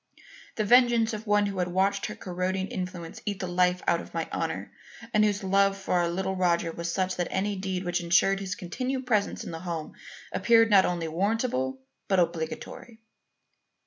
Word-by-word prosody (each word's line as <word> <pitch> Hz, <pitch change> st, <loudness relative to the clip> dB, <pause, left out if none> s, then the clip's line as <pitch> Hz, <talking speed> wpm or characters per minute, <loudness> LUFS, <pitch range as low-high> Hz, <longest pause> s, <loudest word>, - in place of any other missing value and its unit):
The 215 Hz, -, 0 dB
vengeance 240 Hz, 0 st, +5 dB
of 215 Hz, +1 st, -6 dB
one 210 Hz, 0 st, +3 dB
who 195 Hz, -2 st, -3 dB
had 180 Hz, -, +1 dB
watched 195 Hz, +2 st, +1 dB
her -, -, -6 dB
corroding 185 Hz, +1 st, -3 dB
influence 180 Hz, -3 st, -6 dB
eat 205 Hz, -2 st, -3 dB
the -, -, -3 dB
life 180 Hz, 0 st, +1 dB
out 170 Hz, -, +3 dB
of -, -, -13 dB
my -, -, -1 dB
honour -, -, -3 dB, 0.4 s
and 215 Hz, -1 st, +4 dB
whose 205 Hz, -1 st, +1 dB
love 195 Hz, +1 st, +3 dB
for 195 Hz, -, -3 dB
our 175 Hz, -1 st, +2 dB
little 190 Hz, +2 st, -2 dB
Roger 170 Hz, -2 st, +1 dB
was 170 Hz, +1 st, -4 dB
such 185 Hz, +1 st, -1 dB
that 175 Hz, -, 0 dB
any 200 Hz, +2 st, -1 dB
deed 190 Hz, -1 st, -3 dB
which 175 Hz, 0 st, 0 dB
ensured 185 Hz, +3 st, +3 dB
his 190 Hz, -2 st, -4 dB
continued 255 Hz, +10 st, -3 dB
presence 215 Hz, -5 st, 0 dB
in -, -, -6 dB
the 165 Hz, -, -6 dB
home 165 Hz, -3 st, -5 dB, 0.4 s
appeared 225 Hz, -1 st, +4 dB
not 195 Hz, -2 st, +7 dB
only 170 Hz, -2 st, -1 dB
warrantable 165 Hz, -, -1 dB, 0.3 s
but 190 Hz, -2 st, +3 dB
obligatory. 170 Hz, +7 st, -3 dB
190 Hz, 185 wpm, -27 LUFS, 175-205 Hz, 0.4 s, not